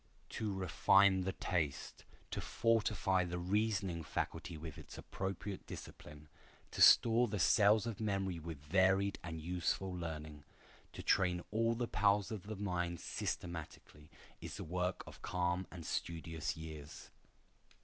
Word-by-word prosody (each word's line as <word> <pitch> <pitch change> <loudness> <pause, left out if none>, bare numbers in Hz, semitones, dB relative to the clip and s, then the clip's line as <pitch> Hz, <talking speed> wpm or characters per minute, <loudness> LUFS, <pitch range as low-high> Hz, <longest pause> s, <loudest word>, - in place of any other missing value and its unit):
To 110 -2 -3
refine 95 +1 +4
the 95 - -1
taste, 75 -7 -2 0.3
to - - -3
fortify 110 -5 +2
the 90 0 -3
reasoning 95 -1 0
faculty 80 +2 -3
with 80 -1 -8
its - - -11
appropriate 95 0 -5
discipline, 75 0 -10 0.4
to - - -3
store 120 +1 +7
the 105 - -3
cells 105 +4 +5
of 115 -4 -4
memory 95 -5 -1
with 80 -1 -6
varied 95 +4 +3
and 80 -1 -5
useful 90 +3 -1
learning, 80 -3 -6 0.5
to - - -7
train 90 -2 +2
all 115 +2 +2
the 120 0 -1
powers 100 -1 +2
of 105 -3 -6
the 110 - -4
mind 90 -4 -2
systematically, 80 -3 -5 0.3
is - - -6
the - - -5
work 90 +2 -2
of - - -12
calm 90 +1 -1
and 85 -3 -9
studious 80 -2 -3
years. 80 -2 -9
90 Hz, 140 wpm, -36 LUFS, 85-100 Hz, 0.5 s, store